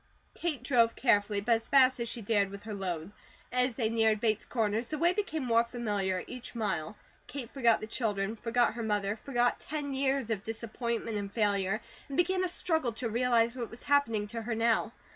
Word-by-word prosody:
Kate 310 Hz, -8 st, -2 dB
drove 235 Hz, -4 st, +3 dB
carefully, 205 Hz, -4 st, +2 dB
but 235 Hz, +4 st, -1 dB
as 225 Hz, 0 st, +2 dB
fast 260 Hz, -2 st, +5 dB
as 235 Hz, -1 st, -2 dB
she 230 Hz, -, -5 dB
dared 200 Hz, -2 st, +2 dB
with 200 Hz, +1 st, -9 dB
her 215 Hz, 0 st, -6 dB
load. 180 Hz, -3 st, -4 dB, 0.4 s
As 250 Hz, -1 st, +2 dB
they 230 Hz, -3 st, +1 dB
neared 220 Hz, -1 st, +2 dB
Bates 220 Hz, -1 st, +1 dB
Corners, 225 Hz, 0 st, -1 dB
the 310 Hz, -, -3 dB
way 340 Hz, +4 st, +3 dB
became 365 Hz, -7 st, -2 dB
more 230 Hz, -1 st, +4 dB
familiar 205 Hz, -6 st, -1 dB
each 250 Hz, -1 st, -8 dB
mile. 205 Hz, -4 st, -2 dB, 0.3 s
Kate 250 Hz, -2 st, -6 dB
forgot 235 Hz, -5 st, +3 dB
the -, -, -3 dB
children, 215 Hz, -2 st, -1 dB
forgot 235 Hz, +1 st, +1 dB
her 235 Hz, -, -5 dB
mother, 210 Hz, -2 st, 0 dB
forgot 245 Hz, +1 st, 0 dB
ten 290 Hz, -2 st, -4 dB
years 265 Hz, -3 st, 0 dB
of 205 Hz, -3 st, -2 dB
disappointment 230 Hz, 0 st, -3 dB
and 200 Hz, -1 st, -4 dB
failure, 200 Hz, -1 st, +1 dB, 0.3 s
and 275 Hz, -, -5 dB
began 370 Hz, +1 st, +2 dB
a -, -, +1 dB
struggle 320 Hz, -8 st, 0 dB
to 230 Hz, +1 st, -3 dB
realize 235 Hz, 0 st, +2 dB
what 240 Hz, -3 st, -4 dB
was 230 Hz, -, -11 dB
happening 235 Hz, -8 st, +2 dB
to 230 Hz, +2 st, -5 dB
her 225 Hz, +1 st, -3 dB
now. 225 Hz, 0 st, +2 dB
230 Hz, 200 wpm, -30 LUFS, 215-255 Hz, 0.4 s, fast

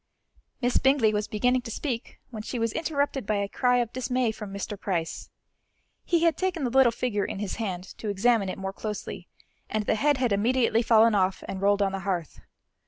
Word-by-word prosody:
Miss 245 Hz, 0 st, +3 dB
Bingley 265 Hz, -5 st, +3 dB
was 210 Hz, 0 st, -1 dB
beginning 250 Hz, +4 st, +1 dB
to 240 Hz, -, -8 dB
speak 235 Hz, 0 st, -4 dB
when 220 Hz, -3 st, -5 dB
she 245 Hz, -, -5 dB
was 230 Hz, -1 st, 0 dB
interrupted 285 Hz, -7 st, -1 dB
by 215 Hz, -, +1 dB
a 200 Hz, 0 st, 0 dB
cry 250 Hz, +4 st, +2 dB
of 240 Hz, -2 st, -1 dB
dismay 255 Hz, -2 st, 0 dB
from 210 Hz, -2 st, -8 dB
Mr. 200 Hz, +1 st, -4 dB
Price. 180 Hz, -5 st, -3 dB, 0.7 s
He 340 Hz, -1 st, +1 dB
had 335 Hz, -2 st, +4 dB
taken 370 Hz, -5 st, -1 dB
the 245 Hz, -, 0 dB
little 265 Hz, -2 st, +5 dB
figure 225 Hz, -3 st, -1 dB
in -, -, -4 dB
his 200 Hz, -1 st, -4 dB
hand 190 Hz, -6 st, -3 dB, 0.2 s
to 215 Hz, -, -4 dB
examine 205 Hz, 0 st, +2 dB
it -, -, -4 dB
more 195 Hz, 0 st, -4 dB
closely, 210 Hz, 0 st, -6 dB, 0.4 s
and 215 Hz, -1 st, -1 dB
the -, -, +2 dB
head 290 Hz, +5 st, +2 dB
had 250 Hz, -3 st, +1 dB
immediately 230 Hz, +2 st, +2 dB
fallen 230 Hz, -1 st, +5 dB
off 190 Hz, -2 st, +1 dB
and 190 Hz, -, -5 dB
rolled 200 Hz, 0 st, +3 dB
on 195 Hz, -, +1 dB
the 195 Hz, -, -3 dB
hearth. 180 Hz, -4 st, -3 dB
225 Hz, 205 wpm, -27 LUFS, 200-250 Hz, 0.7 s, little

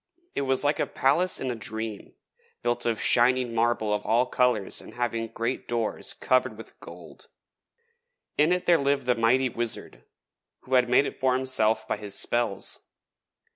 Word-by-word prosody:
It -, -, -2 dB
was 130 Hz, +1 st, +3 dB
like 145 Hz, +1 st, +1 dB
a -, -, 0 dB
palace 165 Hz, +8 st, +2 dB
in 130 Hz, -, -2 dB
a -, -, -4 dB
dream, 110 Hz, -1 st, -6 dB, 0.5 s
built 120 Hz, 0 st, -1 dB
of 115 Hz, -2 st, 0 dB
shining 125 Hz, 0 st, +3 dB
marble 115 Hz, -2 st, +1 dB
of 105 Hz, 0 st, -2 dB
all 120 Hz, +3 st, +2 dB
colours 125 Hz, -5 st, 0 dB
and -, -, -13 dB
having 115 Hz, -2 st, -2 dB
great 115 Hz, +3 st, -4 dB
doors 115 Hz, -2 st, -2 dB
covered 130 Hz, -3 st, 0 dB
with 115 Hz, -, -12 dB
gold. -, -, -13 dB, 1.1 s
In 150 Hz, +3 st, +3 dB
it 180 Hz, 0 st, 0 dB
there 170 Hz, -2 st, +4 dB
lived 140 Hz, -1 st, 0 dB
the 125 Hz, -, +3 dB
mighty 125 Hz, +3 st, +2 dB
Wizard 120 Hz, -2 st, -2 dB, 0.6 s
who 130 Hz, -, -8 dB
had 125 Hz, -1 st, +4 dB
made 125 Hz, +3 st, +4 dB
it -, -, -6 dB
for 130 Hz, -1 st, +2 dB
himself 120 Hz, -4 st, +1 dB
by -, -, -2 dB
his 105 Hz, -1 st, -4 dB
spells. 120 Hz, -3 st, 0 dB
120 Hz, 170 wpm, -26 LUFS, 115-130 Hz, 1.1 s, there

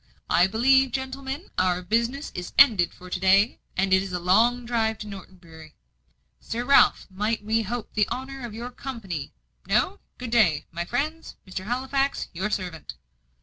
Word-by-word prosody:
"I 180 Hz, -, +5 dB
believe, 260 Hz, +5 st, +3 dB
gentlemen, 265 Hz, +4 st, -5 dB
our 180 Hz, -1 st, +1 dB
business 235 Hz, +9 st, -1 dB
is 180 Hz, 0 st, -6 dB
ended 220 Hz, -11 st, +6 dB
for 180 Hz, -, -14 dB
to 180 Hz, -, -2 dB
day, 195 Hz, +4 st, +3 dB, 0.2 s
and 190 Hz, 0 st, +2 dB
it 190 Hz, -, +5 dB
is 190 Hz, -1 st, -6 dB
a 180 Hz, -, -1 dB
long 230 Hz, +8 st, +3 dB
drive 225 Hz, -2 st, 0 dB
to 210 Hz, -, -8 dB
Norton 195 Hz, -2 st, -10 dB
Bury. 160 Hz, -3 st, -15 dB, 0.6 s
Sir 240 Hz, +2 st, -4 dB
Ralph, 280 Hz, +2 st, +5 dB
might 210 Hz, +3 st, -2 dB
we 220 Hz, +1 st, +2 dB
hope 225 Hz, +2 st, -4 dB
for -, -, -36 dB
the 210 Hz, -, +3 dB
honour 265 Hz, +1 st, -5 dB
of 230 Hz, -3 st, -7 dB
your 240 Hz, +2 st, -6 dB
company? 215 Hz, -, -6 dB, 0.4 s
No? -, -, +1 dB, 0.2 s
Good 245 Hz, -2 st, -6 dB
day, 180 Hz, -11 st, +3 dB
my 170 Hz, +1 st, -4 dB
friends. 305 Hz, -, -3 dB
Mr. 185 Hz, 0 st, -6 dB
Halifax, 265 Hz, +4 st, -1 dB
your 190 Hz, +5 st, -2 dB
servant." 180 Hz, -6 st, -5 dB
220 Hz, 175 wpm, -25 LUFS, 185-250 Hz, 0.6 s, ended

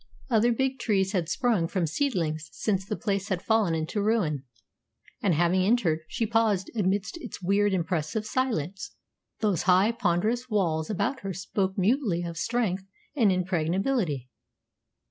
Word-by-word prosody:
Other 230 Hz, +1 st, +4 dB
big 265 Hz, +2 st, 0 dB
trees 195 Hz, -5 st, +1 dB
had 175 Hz, -5 st, -1 dB
sprung 215 Hz, -5 st, +1 dB
from 180 Hz, -1 st, 0 dB
seedlings 160 Hz, -, -1 dB
since 195 Hz, -3 st, -1 dB
the 205 Hz, +2 st, -3 dB
place 200 Hz, -1 st, -2 dB
had 190 Hz, -3 st, 0 dB
fallen 220 Hz, -7 st, +2 dB
into 160 Hz, +7 st, -2 dB
ruin; 185 Hz, -, 0 dB, 0.8 s
and, 185 Hz, -5 st, +2 dB
having 175 Hz, +3 st, +3 dB
entered, 185 Hz, -6 st, +2 dB
she 230 Hz, +7 st, -1 dB
paused 220 Hz, -4 st, +1 dB
amidst 200 Hz, -, 0 dB
its -, -, -7 dB
weird, 200 Hz, +3 st, +2 dB
impressive 175 Hz, +3 st, -1 dB
silence. 200 Hz, -, -2 dB, 0.5 s
Those 205 Hz, -7 st, +1 dB
high, 190 Hz, +5 st, +5 dB
ponderous 230 Hz, +3 st, 0 dB
walls 165 Hz, -7 st, 0 dB
about 245 Hz, +6 st, -1 dB
her 195 Hz, -1 st, -4 dB
spoke 190 Hz, +1 st, -2 dB
mutely 200 Hz, -3 st, +1 dB
of 170 Hz, -1 st, -5 dB
strength 195 Hz, -1 st, -1 dB, 0.3 s
and 225 Hz, -8 st, +4 dB
impregnability. 180 Hz, -, 0 dB
195 Hz, 145 wpm, -27 LUFS, 175-225 Hz, 0.8 s, high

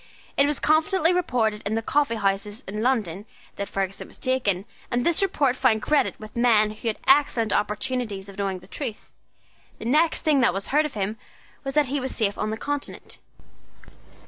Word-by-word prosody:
It 280 Hz, -, +4 dB
was 295 Hz, -1 st, 0 dB
confidently 325 Hz, +3 st, +3 dB
reported 230 Hz, -11 st, 0 dB
in 215 Hz, -, -1 dB
the 225 Hz, -, -1 dB
coffee 285 Hz, -1 st, +1 dB
houses 205 Hz, 0 st, -1 dB
of 190 Hz, -, -6 dB
London 210 Hz, -4 st, -1 dB, 0.3 s
that 200 Hz, -, -4 dB
Ferguson 195 Hz, 0 st, -3 dB
was -, -, -13 dB
taken, 210 Hz, -8 st, 0 dB, 0.2 s
and 240 Hz, +1 st, 0 dB
this 340 Hz, +1 st, +3 dB
report 290 Hz, -9 st, +2 dB
found 230 Hz, -5 st, +2 dB
credit 300 Hz, -1 st, +1 dB
with 215 Hz, 0 st, -11 dB
men 225 Hz, -3 st, +4 dB
who 215 Hz, +2 st, -7 dB
had 220 Hz, -, 0 dB
excellent 265 Hz, -6 st, +4 dB
opportunities 210 Hz, -1 st, -2 dB
of 200 Hz, -, -11 dB
knowing 195 Hz, -2 st, -2 dB
the 185 Hz, -, -16 dB
truth. 235 Hz, -1 st, -6 dB, 0.7 s
The -, -, -9 dB
next 310 Hz, +7 st, +2 dB
thing 305 Hz, -4 st, +3 dB
that 235 Hz, -7 st, +3 dB
was 195 Hz, -, -2 dB
heard 300 Hz, +2 st, +3 dB
of 275 Hz, -, -14 dB
him 210 Hz, +2 st, -2 dB, 0.4 s
was 270 Hz, 0 st, -4 dB
that 300 Hz, -1 st, +4 dB
he 275 Hz, +2 st, -2 dB
was 260 Hz, 0 st, -2 dB
safe 205 Hz, -3 st, +1 dB
on 215 Hz, -, -2 dB
the 220 Hz, -, -3 dB
Continent. 290 Hz, +4 st, -5 dB
230 Hz, 190 wpm, -24 LUFS, 210-280 Hz, 0.7 s, It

